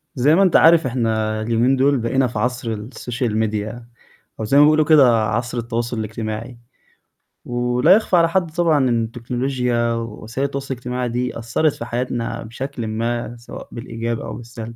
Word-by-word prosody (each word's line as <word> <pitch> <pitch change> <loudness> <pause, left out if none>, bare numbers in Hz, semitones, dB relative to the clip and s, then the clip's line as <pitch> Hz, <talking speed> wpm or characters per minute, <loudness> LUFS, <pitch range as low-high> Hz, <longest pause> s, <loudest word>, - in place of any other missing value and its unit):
زي 145 +4 +4
ما 195 - +5
أنت 185 -4 +2
عارف، 165 -1 +6
إحنا 110 -3 -1
اليومين 115 +4 +2
دول 140 +1 +3
بقينا 125 +3 +1
في 120 - -5
عصر 125 -1 -2
السوشيال 115 +1 -4
ميديا 110 +2 -3 0.5
أو- 110 - -2
زي 135 +6 +2
ما 145 - +8
بيقولوا 155 +1 +4
كده- 130 -8 +5
عصر 120 +3 -2
التواصل 120 0 -3
الاجتماعي. 110 +2 -5 0.9
ولا 125 +2 +1
يخفى 205 -4 +2
على 165 -1 +4
حد 170 -2 0
طبعًا 165 -2 +2
إن 115 -1 +1
التكنولوجيا 120 0 -1
ووسائل 115 +3 -4
التواصل 140 -1 -4
الاجتماعي 125 0 -3
دي، 125 0 -3
أثرت 120 +7 +1
في 115 - -7
حياتنا 120 0 -3
بشكل 120 0 -6
ما، 115 +2 -3
سواء 120 - -10
بالإيجاب 115 -1 -4
أو - - -6
بالسلب. 115 -1 -8
120 Hz, 165 wpm, -20 LUFS, 115-135 Hz, 0.9 s, ما